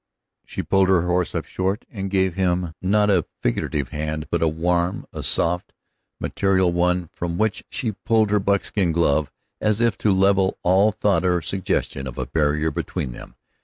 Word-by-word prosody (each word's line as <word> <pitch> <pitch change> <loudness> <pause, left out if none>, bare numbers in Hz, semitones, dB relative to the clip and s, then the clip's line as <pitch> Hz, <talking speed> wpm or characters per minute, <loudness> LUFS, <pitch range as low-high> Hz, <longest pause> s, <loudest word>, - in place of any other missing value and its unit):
She - - -4
pulled 95 -1 +3
her 95 -3 +3
horse 90 -1 0
up - - -2
short, 95 +4 -2
and 100 -2 -4
gave 95 -2 +1
him, 90 -2 0
not 105 +2 +3
a 90 -4 +2
figurative 70 +3 -1
hand, 75 0 -3
but 85 - 0
a 80 - +3
warm, 85 +3 0
a - - -5
soft 90 +1 +1
and - - -10
material 95 -2 +2
one, 90 -1 0
from 85 -1 -3
which 110 -1 0
she 115 - -2
pulled 110 +2 +1
her 105 - +3
buckskin 100 -2 +1
glove 75 -3 +1 0.3
as 110 0 +1
if 115 -3 +1
to 105 - +2
level 95 0 +3
all 95 +4 +4
thought 100 -4 +1
or 90 -1 +2
suggestion 80 -5 -2
of - - -8
a - - -2
barrier 75 0 0
between 65 - -3
them. - - -11
90 Hz, 180 wpm, -22 LUFS, 85-100 Hz, 0.3 s, all